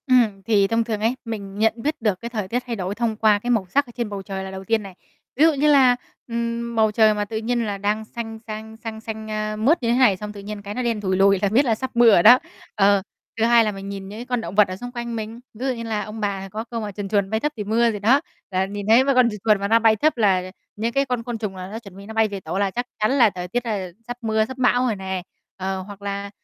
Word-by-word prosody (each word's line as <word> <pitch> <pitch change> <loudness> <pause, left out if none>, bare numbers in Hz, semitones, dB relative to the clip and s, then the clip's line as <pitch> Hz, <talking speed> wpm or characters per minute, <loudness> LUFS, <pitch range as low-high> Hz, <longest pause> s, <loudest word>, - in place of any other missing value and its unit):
Ừm, 230 -6 +3
thì 205 -3 +3
thông 230 +2 +1
thường 220 -2 -3
ấy, 225 +3 +1
mình 200 -4 -6
nhận 220 0 +3
biết 300 +2 -2
được 210 -4 0
cái 235 - -5
thời 215 -5 -3
tiết 245 +5 -2
thay 235 - -2
đổi 190 -1 -3
thông 230 -1 -1
qua 215 -2 +4
cái 240 - -5
màu 225 -6 +2
sắc 280 +8 +2
ở 240 - -13
trên 235 -3 -2
bầu 200 -1 -5
trời 195 -1 -5
là 190 - -6
đầu 190 0 -7
tiên 225 +1 +1
này. 195 -1 -9 0.4
Ví 290 - +3
dụ 325 - +5
như 290 +1 +1
là, 260 -3 +6 0.3
ừm, 235 0 -3
bầu 220 -1 +3
trời 215 0 +4
mà 210 0 -2
tự 220 +2 -5
nhiên 235 +1 -1
là 205 -2 -3
đang 210 +2 -1
xanh 225 -1 -7
xanh 220 +1 -7
xanh 220 -1 -5
xanh, 220 -1 -6
a, 215 0 -2
mướt 255 +8 +2
như 230 - +1
thế 240 - +2
này 240 -8 +5
xong 210 +1 -7
tự 205 - -9
nhiên, 205 +1 -7
cái, 200 0 -6
nó 255 - -3
đen 230 -3 -1
thủi 190 -2 0
lùi 195 0 +4
là 200 - +2
biết 250 +8 +3
là 230 -3 +2
sắp 260 +3 -5
mưa 235 -1 +7
rồi 175 -4 +5
đó. 245 +3 +9 0.4
Ờ, 200 -2 +4 0.4
thứ 225 - +1
hai 235 0 +6
là 215 - 0
mình 195 0 -7
nhìn 195 -1 -6
những 220 +4 -7
con 245 -2 -1
động 200 - -6
vật 210 -1 +6
ở 185 - -5
xung 245 +5 -7
quanh 235 -1 -5
mình, 220 +1 -5
ví 235 +4 -6
dụ 260 - +1
như 230 -1 -6
là 220 -2 -2
ông 215 +2 -8
bà 195 -2 -3
có 215 +3 -5
câu 230 -1 -5
mà 210 -1 -4
chuồn 200 0 -5
chuồn 200 -2 +1
mây 220 +1 0
thấp 295 +5 -1
thì 210 - -3
mưa 230 +3 +2
gì 210 - -5
đó, 245 +8 +4 0.3
là 185 0 +1
nhìn 200 +1 -6
thấy 235 +4 +7
mấy 275 0 +1
con 250 -2 +5
chuồn 210 - -6
chuồn 215 -2 +4
mà 200 - -1
nó 225 +2 +4
bay 225 -1 +4
thấp, 300 +5 +1
là 185 -4 +2 0.2
những 225 +3 -1
cái 275 +2 +1
con 250 -3 -2
côn 240 -1 -4
trùng 210 -3 -4
là 185 0 -7
nó 220 - -5
chuẩn 200 -5 -13
bị 200 - -10
nó 220 - -8
bay 220 0 +3
về 200 -2 -5
tổ 190 - -5
là 200 -1 +1
chắc 245 +5 -3
chắn 215 +2 +2
là 250 -5 +5
thời 180 -2 -6
tiết 245 +6 -2
đây 220 -4 -2
là 185 -2 -6 0.2
sắp 245 0 -5
mưa, 220 -1 +1
sắp 260 +3 -9
bão 250 -1 +3
rồi 230 -4 0
nè. 190 -1 -4 0.4
Ờ, 190 0 -3
hoặc 200 +1 -11
là, 200 0 -4
220 Hz, 310 wpm, -22 LUFS, 200-235 Hz, 0.4 s, đó